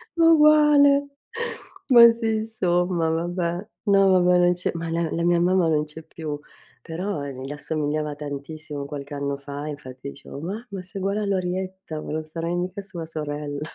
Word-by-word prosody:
ma 330 - +4
uguale. 295 -2 +6 0.8
Ma 235 -2 +9
sì 225 -1 -1
insomma 180 -6 0
vabbè, 175 +3 -2 0.2
no, 195 -2 +5
vabbè, 180 -1 +5
non 175 0 +4
c'è 180 - -2
ma 165 0 -4
la 165 0 0
la 170 - -1
mia 175 0 +3
mamma 180 -1 +3
non 150 -1 +2
c'è 155 +2 -11
più, 155 -3 -6 0.4
però 165 -2 -4
gli 135 0 -6
assomigliava 150 0 -2
tantissimo 145 0 -6
qualche 145 0 -7
anno 140 0 -2
fa, 145 +1 -7
infatti 140 -2 -7
dicevo: 140 - -10
"Mamma 200 +2 -5
sei 190 +2 -8
uguale 200 +2 0
alla 200 -1 0
Orietta, 185 -3 -4
ma - - -7
non 155 0 -2
sarai 165 +2 -3
mica 180 +3 -3
sua 180 -4 -7
sorella". 145 -2 -4
170 Hz, 165 wpm, -24 LUFS, 150-190 Hz, 0.8 s, Ma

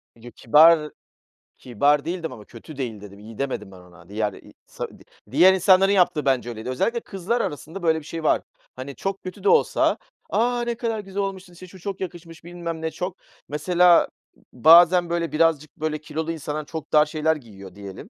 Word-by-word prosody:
Yo, 120 +1 -13
kibar 150 +6 +5 0.7
Kibar 140 +5 +1
değil 175 +2 -2
demedim 160 -5 -5
ama 105 -3 -12
kötü 135 +5 -13
değil 115 -6 -5
dedim, 100 -1 -12
iyi 110 +1 -12
demedim 115 -8 -4
ben 95 - -13
ona. 90 +1 -18
Diğer 105 -1 -2
i - - -15
sa - - -6
di - - -17 0.3
diğer 180 +7 +6
insanların 190 +1 +4
yaptığı 180 -6 +2
bence 130 -3 +1
öyleydi. 110 +1 -7
Özellikle 230 - -1
kızlar 210 +4 -3
arasında 160 +4 -6
böyle 160 -1 +2
bir 150 - -15
şey 165 -1 -6
var. - - +2 0.3
Hani, 130 +2 -8
çok 195 0 -4
kötü 185 - -9
de 420 - +3
olsa 470 0 +3 0.3
"A! 240 +2 +1
Ne 235 0 -2
kadar 225 -2 -3
güzel 195 0 -4
olmuşsun, 190 -2 -5
işte, 185 +1 -12
şu 185 +1 -15
çok 195 +1 -6
yakışmış, 170 -2 -8
bilmem 170 -2 -6
ne 160 - -3
çok." 180 +2 -5 0.3
Mesela 175 +3 +4 0.3
b - - -21
bazen 175 +2 +7
böyle 170 -1 -2
birazcık 160 0 +1
böyle 155 0 -2
kilolu 160 +2 -4
insanlar 150 -1 -5
çok 160 -1 -8
dar 150 0 +6
şeyler 155 +1 0
giyiyor 100 -9 -13
diyelim. 100 -2 -10
160 Hz, 195 wpm, -23 LUFS, 135-180 Hz, 0.7 s, bazen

